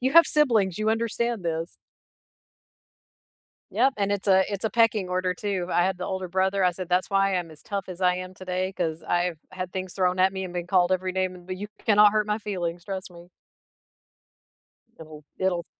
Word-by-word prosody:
You 265 - +2
have 335 -2 +8
siblings, 225 - +3
you 215 +1 +1
understand 230 +1 0
this. 165 0 -3 1.9
Yep, 270 0 +2
and 200 0 +1
it's 200 0 -2
a 190 0 +5
it's 200 0 -3
a 220 - +1
pecking 220 -4 +2
order 185 0 0
too, 185 -2 -3
I 175 - +3
had 190 0 0
the 180 - -4
older 190 -1 -4
brother, 190 +1 +1
I 180 - +4
said, 180 0 -6
"That's 180 +2 +1
why 195 -1 +2
I'm 170 -3 -3
as 155 - -11
tough 200 -2 -4
as 185 0 -7
I 180 -1 +3
am 185 0 -6
today 185 0 -3
'cause 165 -3 -3
I've 175 -2 0
had 185 -1 -6
things 185 -1 -4
thrown 185 -1 +1
at 190 +1 +5
me 190 -1 -4
and 180 - -8
been 175 0 -4
called 185 -1 +3
every 185 0 -1
name 185 0 -1
in 175 0 -15
th 185 0 -5
You 205 - -5 0.2
cannot 210 -1 +6
hurt 215 -1 +2
my 210 0 0
feelings, 175 -5 -4
trust 190 -2 -5
me." 175 0 -14 1.7
It’ll 155 -1 -11 0.2
it'll 180 -3 0
185 Hz, 205 wpm, -26 LUFS, 180-200 Hz, 1.9 s, have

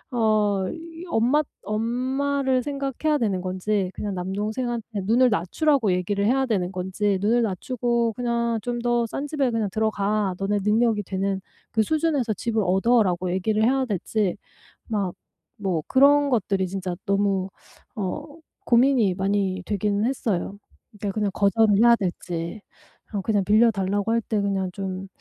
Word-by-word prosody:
어 215 -4 +2 0.4
엄마 255 +4 +2 0.2
엄마를 255 +5 0
생각해야 280 +1 -1
되는 200 -6 0
건지 185 +1 -1
그냥 205 -1 -4
남동생한테 210 +3 -3
눈을 245 +4 +4
낮추라고 215 - +1
얘기를 200 +3 0
해야 265 +3 +2
되는 190 -5 -1
건지 190 +2 -1
"눈을 235 +3 +3
낮추고 235 +2 -1
그냥 235 -2 0
좀 240 -1 -3
더 240 -1 +1
싼 275 +6 -4
집에 280 -4 0
그냥 220 -3 0
들어가. 210 -2 0
너네 200 +1 0
능력이 215 -1 +2
되는 195 0 -2 0.3
그 220 - +2
수준에서 295 -4 0
집을 225 -1 -1
얻어."라고 185 -2 +2
얘기를 215 +4 0
해야 265 +2 +2
될지 205 -2 -1 0.5
막 200 -5 -1 0.4
뭐 185 -6 -1
그런 285 +2 +5
것들이 195 -5 0
진짜 185 -1 -4
너무 195 -1 +1 0.5
어 210 +8 -3 0.4
고민이 240 -4 +4
많이 190 -1 0
되긴 205 0 0
했어요. 205 -6 -2 0.5
그냥 210 -2 0
거절을 205 +1 +3
해야 235 +1 +6
될지 175 0 -4 0.6
그냥 205 -3 +1
빌려 225 +2 +5
달라고 200 +2 -1
할 230 - +3
때 210 -1 -1
그냥 195 -2 -1
좀 190 -1 -5
215 Hz, 290 characters per minute, -24 LUFS, 195-240 Hz, 0.6 s, 해야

